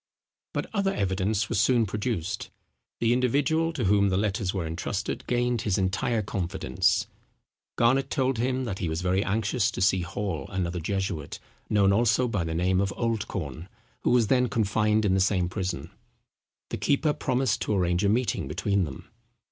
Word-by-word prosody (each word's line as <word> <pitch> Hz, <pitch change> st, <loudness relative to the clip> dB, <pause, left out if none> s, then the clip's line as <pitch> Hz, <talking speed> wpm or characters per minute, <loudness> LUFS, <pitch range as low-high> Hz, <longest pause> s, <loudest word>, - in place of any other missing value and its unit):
But -, -, -1 dB
other 200 Hz, -2 st, +1 dB
evidence 100 Hz, +2 st, 0 dB
was 110 Hz, -3 st, +1 dB
soon 120 Hz, -2 st, +3 dB
produced. 100 Hz, -3 st, -3 dB, 0.5 s
The 115 Hz, 0 st, +3 dB
individual 145 Hz, +6 st, +2 dB
to 140 Hz, -7 st, -2 dB
whom 100 Hz, 0 st, +3 dB
the 95 Hz, -, +1 dB
letters 100 Hz, -2 st, 0 dB
were 95 Hz, -4 st, -3 dB
entrusted 80 Hz, +1 st, -3 dB
gained 120 Hz, -2 st, +1 dB
his 100 Hz, -4 st, 0 dB
entire 100 Hz, +4 st, 0 dB
confidence. 95 Hz, -8 st, 0 dB, 0.7 s
Garnet 130 Hz, +4 st, +3 dB
told 130 Hz, -3 st, 0 dB
him 130 Hz, +2 st, 0 dB
that 105 Hz, -6 st, -4 dB
he 85 Hz, -, -1 dB
was 80 Hz, +2 st, -2 dB
very 95 Hz, +2 st, +2 dB
anxious 105 Hz, +2 st, +1 dB
to -, -, -6 dB
see 95 Hz, 0 st, +3 dB
Hall, 95 Hz, 0 st, -3 dB
another 90 Hz, -3 st, -2 dB
jesuit, 95 Hz, -3 st, -3 dB, 0.3 s
known 100 Hz, -2 st, +4 dB
also 120 Hz, +3 st, +3 dB
by 105 Hz, -6 st, -1 dB
the 80 Hz, 0 st, -3 dB
name 90 Hz, +2 st, +2 dB
of 100 Hz, 0 st, 0 dB
Oldcorn, 100 Hz, -, -3 dB, 0.3 s
who -, -, 0 dB
was 120 Hz, -2 st, +4 dB
then 125 Hz, +2 st, +2 dB
confined 105 Hz, 0 st, +1 dB
in 95 Hz, -, +3 dB
the 95 Hz, -, +3 dB
same 95 Hz, -2 st, +2 dB
prison. 95 Hz, 0 st, -4 dB, 0.8 s
The -, -, -2 dB
keeper 150 Hz, +1 st, +2 dB
promised 130 Hz, -4 st, 0 dB
to -, -, 0 dB
arrange 90 Hz, 0 st, +1 dB
a 100 Hz, -, +3 dB
meeting 115 Hz, -, 0 dB
between 100 Hz, +6 st, 0 dB
them. 70 Hz, -4 st, -9 dB
100 Hz, 170 wpm, -27 LUFS, 95-120 Hz, 0.8 s, known